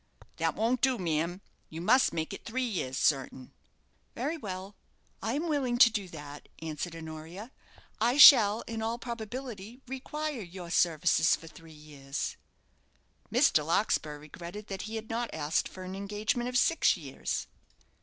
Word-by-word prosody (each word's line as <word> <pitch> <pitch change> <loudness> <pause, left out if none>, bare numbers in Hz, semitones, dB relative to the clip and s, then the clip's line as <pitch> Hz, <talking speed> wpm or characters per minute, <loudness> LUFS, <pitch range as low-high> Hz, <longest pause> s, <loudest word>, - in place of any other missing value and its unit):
"That - - 0
won't 235 +3 +1
do, 260 -2 +3
ma'am; 170 0 -1 0.3
you 160 - -7
must 245 +10 +4
make 160 0 -3
it - - -8
three 255 +3 -2
years, 160 - -3
certain." 135 -3 0 0.6
"Very 285 +7 -2
well; 195 - -7 0.5
I 225 +4 -1
am 310 +5 -1
willing 270 -6 0
to 235 -1 +8
do 205 -3 -3
that," 145 -3 -10
answered 160 +1 -5
Honoria. 165 +7 -8 0.5
"I 240 +5 +2
shall, 225 -7 +9
in 225 -1 -5
all 225 +1 -1
probability, 235 -1 -7
require 280 +1 -4
your 175 -2 -8
services 165 -1 +3
for - - -13
three 165 0 -14
years." 150 -2 -6 1.0
Mr. - - +4
Larkspur 150 -1 0
regretted 170 +7 -9
that 195 -1 -4
he 225 - -5
had 220 0 -5
not 235 +1 -2
asked 155 +1 0
for 185 - -9
an 185 0 -6
engagement 210 +5 -2
of 250 - 0
six 330 +6 +3
years. - - -4
200 Hz, 155 wpm, -30 LUFS, 160-240 Hz, 1.0 s, shall